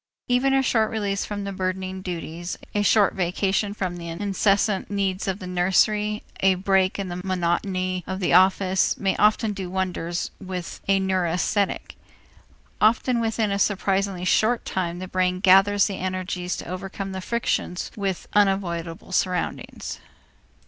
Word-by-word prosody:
Even 250 +2 +2
a 270 - +3
short 220 -3 +2
release 200 -2 -1
from 205 -1 -4
the 200 - -4
burdening 185 0 -3
duties, 175 -1 -5 0.2
a 205 - +1
short 205 0 +4
vacation 195 +3 0
from 185 -4 -3
the 170 -1 -7
incessant 195 +3 +1
needs 195 -2 -1
of 190 -1 -1
the 195 - -8
nursery, 210 +4 +1 0.2
a 190 -1 +4
break 190 0 +2
in 200 -1 -3
the 175 +1 -5
monotony 185 0 -1
of 190 0 -3
the 180 - +1
office, 185 +1 +4
may 195 -1 0
often 215 0 +3
do 190 -3 -5
wonders 180 -2 -2
with 185 -2 -6
a 195 0 +4
neurasthenic. 190 +1 0 0.8
Often 235 +3 +3
within 225 -2 0
a 200 - 0
surprisingly 195 -2 0
short 225 +5 +2
time 175 -2 -2
the 185 +1 -6
brain 185 0 0
gathers 195 +1 +5
the 195 -3 -3
energies 185 -1 -3
to - - -7
overcome 195 +2 -5
the 190 0 -5
frictions 205 -4 -2
with 195 -3 -3
unavoidable 185 -4 0
surroundings. 180 0 -2
190 Hz, 150 wpm, -24 LUFS, 185-205 Hz, 0.8 s, gathers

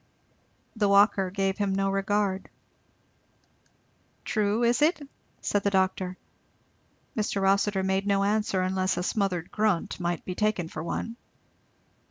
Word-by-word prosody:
The 210 -2 +2
walker 200 -1 +4
gave 195 +1 -1
him 200 -2 0
no 195 0 +1
regard. 195 -1 0 1.8
"True, 215 +2 +1
is 235 +4 +2
it?" 315 +3 +3 0.4
said 205 - 0
the 200 - +1
doctor. 190 -1 0 1.0
Mr. 210 -2 -1
Rossitur 195 0 +2
made 190 +1 0
no 200 -1 +2
answer, 205 -2 +1
unless 185 0 0
a 180 - -1
smothered 185 -4 -1
grunt 210 -6 0
might 175 -1 -2
be 185 - -3
taken 205 -4 0
for 155 - -6
one. 230 +7 -4
195 Hz, 130 wpm, -27 LUFS, 190-205 Hz, 1.8 s, walker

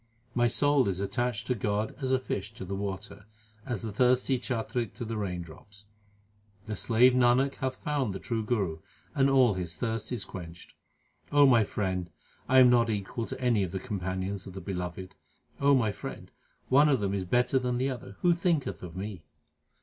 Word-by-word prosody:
My 120 -1 +3
soul 145 +1 +3
is 95 -2 -1
attached 115 +3 -1
to 125 - +1
God 105 -1 -1
as 130 -1 -1
a 130 - +4
fish 105 -4 -4
to 95 - -7
the 95 - -5
water, 100 +1 -5 0.4
as 120 -6 -3
the 110 - -4
thirsty 125 +3 +2
chatrik 120 -2 -3
to 120 - -5
the 115 0 -4
raindrops. 100 +1 -6 0.8
The 105 0 -4
slave 120 +4 +4
Nanak 125 +2 +3
hath 130 0 -2
found 145 -7 -1
the 95 - -4
True 115 0 -2
Guru, 100 -8 -1 0.3
and 135 0 +3
all 130 -5 +5
his 90 -3 -5
thirst 115 -2 -3
is 120 -6 -2
quenched. 85 -2 -10 0.6
O 145 0 +6
my 120 -4 +6
friend, 95 -4 -2 0.4
I 130 - +5
am 130 -1 +9
not 120 -1 +4
equal 110 +2 -3
to 130 - -6
any 120 -5 +2
of 95 -3 -2
the 95 - -3
companions 95 0 -4
of 95 - -8
the 95 - -6
Beloved. 90 0 -5 0.5
my 135 -6 +4
friend, - - -8 0.4
one 145 +3 +5
of 135 -4 +3
them 100 -1 -1
is 100 -2 -1
better 125 +7 +2
than 125 -1 -1
the 130 +2 0
other; 125 0 -8
who 175 -1 +5
thinketh 160 - -1
of 90 -1 -8
me 100 -2 -5
110 Hz, 190 wpm, -29 LUFS, 95-130 Hz, 0.8 s, am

